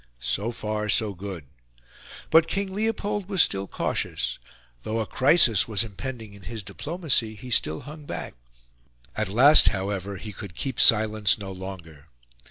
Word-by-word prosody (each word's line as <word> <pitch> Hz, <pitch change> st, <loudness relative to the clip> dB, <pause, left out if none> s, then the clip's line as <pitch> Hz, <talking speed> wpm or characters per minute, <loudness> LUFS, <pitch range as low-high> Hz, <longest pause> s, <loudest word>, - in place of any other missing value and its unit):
So 80 Hz, -, -2 dB
far 105 Hz, -2 st, -3 dB
so 105 Hz, -1 st, +2 dB
good. 95 Hz, -4 st, -7 dB, 0.9 s
But 160 Hz, +1 st, +6 dB
King 195 Hz, 0 st, -2 dB
Leopold 205 Hz, -1 st, -2 dB
was 190 Hz, -4 st, +5 dB
still 95 Hz, 0 st, -1 dB
cautious; -, -, -2 dB, 0.4 s
though 110 Hz, -, -3 dB
a 110 Hz, -, -1 dB
crisis 130 Hz, -, +4 dB
was 110 Hz, -3 st, 0 dB
impending 115 Hz, 0 st, -7 dB
in 100 Hz, -, -14 dB
his 110 Hz, +1 st, -7 dB
diplomacy, 145 Hz, -, -2 dB
he 125 Hz, +3 st, -10 dB
still 80 Hz, -8 st, 0 dB
hung 150 Hz, +2 st, -11 dB
back; -, -, -6 dB, 0.8 s
at 110 Hz, -2 st, -1 dB
last, 135 Hz, +9 st, +7 dB
however, 100 Hz, 0 st, -2 dB
he 105 Hz, +2 st, -8 dB
could 95 Hz, -3 st, -9 dB
keep 135 Hz, -4 st, -4 dB
silence 110 Hz, -2 st, +4 dB
no 100 Hz, -2 st, -7 dB
longer. 90 Hz, -6 st, -9 dB
110 Hz, 150 wpm, -25 LUFS, 95-135 Hz, 0.9 s, last